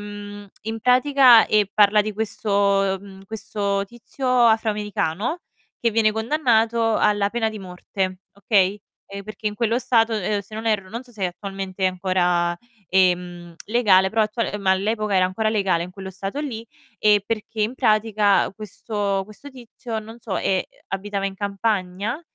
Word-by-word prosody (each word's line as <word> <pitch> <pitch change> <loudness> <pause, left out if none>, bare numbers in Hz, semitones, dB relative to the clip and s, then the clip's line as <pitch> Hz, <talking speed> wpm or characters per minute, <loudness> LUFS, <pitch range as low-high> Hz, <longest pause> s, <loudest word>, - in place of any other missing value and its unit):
ehm, 205 0 -9
in 225 +1 -5
pratica, 250 0 +6
ehm, 210 -1 +3
parla 210 0 +5
di 215 - -4
questo 200 -2 +1
ehm, 195 0 -13
questo 200 -2 -2
tizio 240 +4 -6 0.2
afroamericano 210 - 0 0.4
che 230 - +2
viene 220 -1 +2
condannato 225 -2 +1
alla 205 -1 +2
pena 225 -2 0
di 215 - -8
morte, 185 0 -4
okay. 200 0 +1 0.3
Ehm, 200 0 -7
perché 215 0 -7
in 210 - -1
quello 230 +1 0
stato, 230 -3 +2
ehm, 205 0 -1
se 200 +2 -13
non 220 +1 -5
erro, 205 -4 0
non 235 +3 -5
so 245 - -17
se 215 -4 -8
è - - +3
attualmente 195 +1 -4
ancora, 180 -2 +1 0.3
ehm, 180 -2 +1
legale, 200 -5 +4
però 220 +3 +1
attuale 215 0 -2
ma 195 -2 +1
all'epoca 210 +2 -1
era 185 -1 +4
ancora 215 +4 -1
legale 195 -6 +1
in 180 - -10
quello 190 0 -8
stato 195 +8 -5
lì 230 -6 -5 0.3
e 210 -1 +4
perché 220 0 -3
in 220 +4 -1
pratica 215 -4 +2
questo 205 -1 -3
questo 215 +8 -13
tizio 240 -2 -7
non 225 +2 -11
so, 210 -5 -4
ehm, 190 -1 +1 0.3
abitava 195 0 -3
in 195 - -5
campagna 200 - -2
210 Hz, 160 wpm, -22 LUFS, 195-225 Hz, 0.4 s, pratica